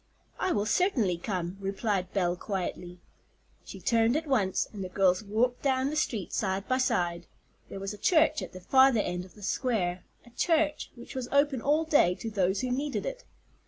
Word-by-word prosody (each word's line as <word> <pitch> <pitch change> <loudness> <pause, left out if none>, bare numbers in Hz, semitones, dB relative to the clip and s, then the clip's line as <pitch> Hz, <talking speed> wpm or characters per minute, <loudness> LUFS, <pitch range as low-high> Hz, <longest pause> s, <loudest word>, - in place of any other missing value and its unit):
"I 375 - 0
will 205 -7 0
certainly 225 - +1
come," 180 -1 -3
replied 195 -1 -2
Belle 180 -3 +1
quietly. 180 -2 -4 0.7
She - - -10
turned 230 +2 +2
at 320 - -3
once, 215 -10 +1
and 200 -2 -5
the 185 - -5
girls 185 0 +2
walked 230 +4 0
down 265 0 +1
the - - -3
street 225 - -2
side 195 -1 -1
by 255 0 +1
side. 175 -9 0 0.4
There 195 - -7
was 195 +1 -4
a 210 - -11
church 315 - +3
at - - -6
the 185 - -10
farther 260 +1 +5
end 180 -1 -3
of 185 - -18
the 210 - -13
square, 190 -6 -1 0.2
a 240 - -17
church 315 +4 +1
which 240 - -11
was 260 -2 -4
open 280 -3 +2
all 300 +5 +2
day 290 - +4
to 225 - -6
those 190 -1 +1
who 255 -1 -2
needed 280 +3 -2
it. - - -5
215 Hz, 195 wpm, -29 LUFS, 185-265 Hz, 0.7 s, farther